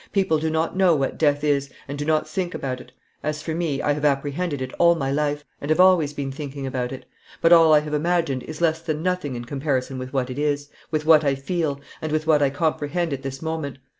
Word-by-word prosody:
People 190 -6 +2
do 160 +1 -1
not 160 +2 -1
know 185 -3 +4
what 135 -2 -2
death 145 -2 +2
is, 140 -2 +1 0.2
and 140 - -5
do 145 +1 -4
not 155 0 +1
think 175 +3 -3
about 130 -2 -3
it. - - -16 0.3
As 150 0 -3
for 160 - -3
me, 160 -4 -1
I 145 - +2
have 145 0 -5
apprehended 145 +2 0
it 130 0 -5
all 170 0 +6
my 135 -4 -2
life, 145 0 -1 0.2
and 145 - -5
have 155 - +2
always 180 -5 +5
been 140 -2 -4
thinking 140 0 -6
about 125 -2 -2
it. 130 - -8 0.3
But 165 +1 +5
all 165 -2 +7
I 150 -1 +6
have 150 0 -6
imagined 155 -4 +1
is 155 +4 -8
less 160 -1 +2
than 155 -2 -3
nothing 180 -7 -1
in 120 0 -6
comparison 135 -1 -2
with 130 0 -6
what 130 -2 -1
it 130 - -5
is, 145 -1 -1 0.2
with 155 -1 -1
what 155 -1 +6
I 140 -2 +2
feel, 145 0 -2 0.2
and 155 - -3
with 155 0 0
what 155 -2 +4
I 140 - +4
comprehend 155 +2 -1
at 135 - -4
this 135 +1 -6
moment. 160 -4 -3
150 Hz, 245 wpm, -23 LUFS, 140-160 Hz, 0.3 s, all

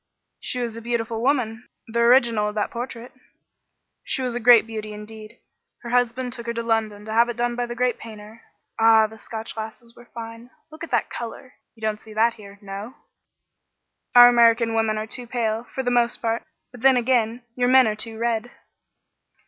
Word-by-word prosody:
"She 250 - -4
was 235 -2 -3
a 230 - -7
beautiful 230 -1 -2
woman, 245 -3 -1 0.2
the 235 +1 -2
original 235 -3 +4
of 210 - -9
that 210 - -1
portrait." 240 0 -6 0.9
"She 265 -4 -3
was 250 -1 -2
a 240 - -2
great 240 -1 +7
beauty, 215 -1 -6
indeed. 215 +2 -10 0.5
Her 235 - -6
husband 245 0 0
took 235 -2 -7
her 235 - -3
to 235 - -2
London 220 -2 -1
to 220 - -5
have 235 +2 +4
it 240 - -5
done 240 0 -1
by 245 0 -2
the 240 - -6
great 250 0 0
painter. 220 0 -11 0.4
Ah, 225 -1 +6
the 220 +1 -9
Scotch 220 0 -7
lasses 225 +2 -8
were 240 - -16
fine! 230 +1 -9 0.2
Look 315 +1 -10
at 335 - -6
that 240 -3 0
color! 245 +2 -7 0.2
You 225 - -21
don't 215 -1 -2
see 220 - -13
that 230 +2 +3
here, 200 -2 -13
no?" 200 +6 -7 1.2
"Our 245 0 +11
American 230 -1 +4
women 225 -1 +1
are 215 - -3
too 240 +2 -4
pale, 230 -1 -2
for 265 - -5
the 245 - 0
most 240 -1 +2
part; 230 0 -1 0.3
but 245 -2 -13
then 265 0 +5
again, 240 -1 +1
your 245 -1 +1
men 260 0 +6
are 215 -1 0
too 220 +1 -7
red." 230 0 -1
230 Hz, 195 wpm, -23 LUFS, 220-245 Hz, 1.2 s, Our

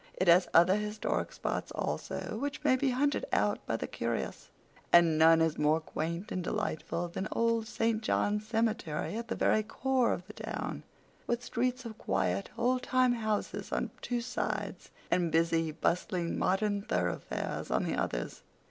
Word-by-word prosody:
It 185 - 0
has 175 +2 +6
other 180 +4 +6
historic 210 0 -2
spots - - -3
also, - - -3
which 285 +1 -3
may 275 -3 +5
be 270 +1 +1
hunted 280 +3 +1
out - - +1
by - - 0
the - - -3
curious, - - -3 0.4
and 170 -2 +6
none 160 +1 +6
is 160 -1 +1
more 150 +2 +3
quaint 170 +6 -4
and 185 - -2
delightful 175 -3 -2
than 190 +4 -4
Old 230 -1 +1
St. 225 -1 0
John's 210 -1 0
Cemetery 220 -7 -1
at 230 +1 -4
the - - -2
very 215 - +3
core 255 +3 +1
of 180 - -3
the 210 - -11
town, - - -4 0.5
with 240 0 -1
streets 250 +2 -1
of 220 -2 -8
quiet, 95 +2 0
old 250 +2 +2
time 255 -1 +3
houses 220 -3 -2
on - - -1
two 245 -1 -1
sides, 245 +1 -3 0.2
and 175 -2 +2
busy, 165 0 +2
bustling, 170 +2 -1
modern 200 +2 +1
thoroughfares 90 - -2
on - - +1
the - - -1
others. - - -2
210 Hz, 165 wpm, -31 LUFS, 170-235 Hz, 0.5 s, has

